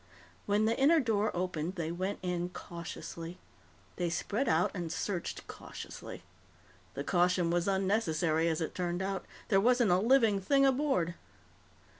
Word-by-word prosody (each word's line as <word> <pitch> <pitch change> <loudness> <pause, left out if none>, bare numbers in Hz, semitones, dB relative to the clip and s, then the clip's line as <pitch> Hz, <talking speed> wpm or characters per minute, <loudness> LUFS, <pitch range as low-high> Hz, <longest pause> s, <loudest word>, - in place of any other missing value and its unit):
When 205 +1 +3
the 225 +1 +2
inner 310 +5 +6
door 220 -5 +1
opened, 180 -1 -2
they 165 -3 -2
went 185 +4 -2
in 180 -1 -1
cautiously. 170 0 -7 0.6
They 175 - 0
spread 210 +9 -1
out 160 +2 +3
and 175 -4 -4
searched 180 0 -3
cautiously. - - -9 0.7
The - - -3
caution 180 -1 +2
was 175 +1 +1
unnecessary, 180 -5 +1
as 160 0 0
it 160 - -2
turned 175 0 -2
out. 195 0 -3 0.2
There 195 -3 +4
wasn't 240 -2 +4
a 180 - +4
living 225 -3 +4
thing 275 +8 +4
aboard. 265 - +2
185 Hz, 145 wpm, -32 LUFS, 170-215 Hz, 0.7 s, inner